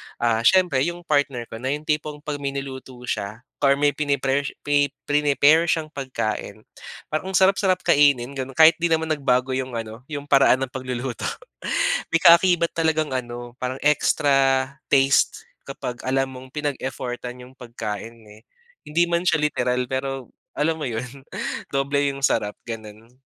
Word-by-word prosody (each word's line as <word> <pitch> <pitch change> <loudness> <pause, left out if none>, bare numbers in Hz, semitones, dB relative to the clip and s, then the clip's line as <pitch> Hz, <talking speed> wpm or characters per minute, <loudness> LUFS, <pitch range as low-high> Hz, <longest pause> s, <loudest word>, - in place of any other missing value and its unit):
Ah, 115 -2 +1
siyempre 180 -7 +4
'yong 170 +5 -2
partner 145 -6 0
ko 115 - -7
na 130 - -4
'yong 150 - -9
tipong 150 -1 -2
'pag 150 -2 -4
may 140 -1 -3
niluto 130 -1 -6
siya 110 -1 -4 0.2
or 140 -1 +4
may 145 +1 +2
pini-pare 140 -1 0 0.2
pe 145 -1 +1
preni-pare 150 +2 +3
siyang 160 -2 0
pagkain, 110 -7 -4 0.5
parang 185 +5 -2
ang - - 0
sarap-sarap 190 -1 +3
kainin 140 -3 +4
gano'n 135 -1 -6
kahit 160 0 +7
'di 170 - +2
naman 160 -1 0
nagbago 130 -3 +1
'yong 130 -1 -3
ano 115 +2 -7
'yong 145 -2 -5
paraan 135 -2 +4
ng 130 - -5
pagluluto. 130 -1 -4 0.9
May 165 - +3
kaakibat 170 0 +6
talagang 160 -2 +1
ano 120 -1 -5
parang 130 +1 -3
extra 135 -2 +3 0.3
taste 135 0 +3 0.2
kapag 120 -1 -6
alam 135 0 +1
mong 130 0 -10
pinag-effortan 125 -4 -4
'yong 125 - -14
pagkain, 115 -2 -6
eh. 105 +1 -15 0.5
Hindi 165 +3 +2
man 170 0 +1
siya - - +3
literal 125 -4 0
pero 135 -1 -3 0.3
alam 160 +2 0
mo 150 - -3
'yon, 125 +4 -6 0.5
doble 140 +1 +1
'yong 140 0 -7
sarap 105 0 0
gano'n. 115 +1 -9
135 Hz, 155 wpm, -23 LUFS, 125-150 Hz, 0.9 s, kahit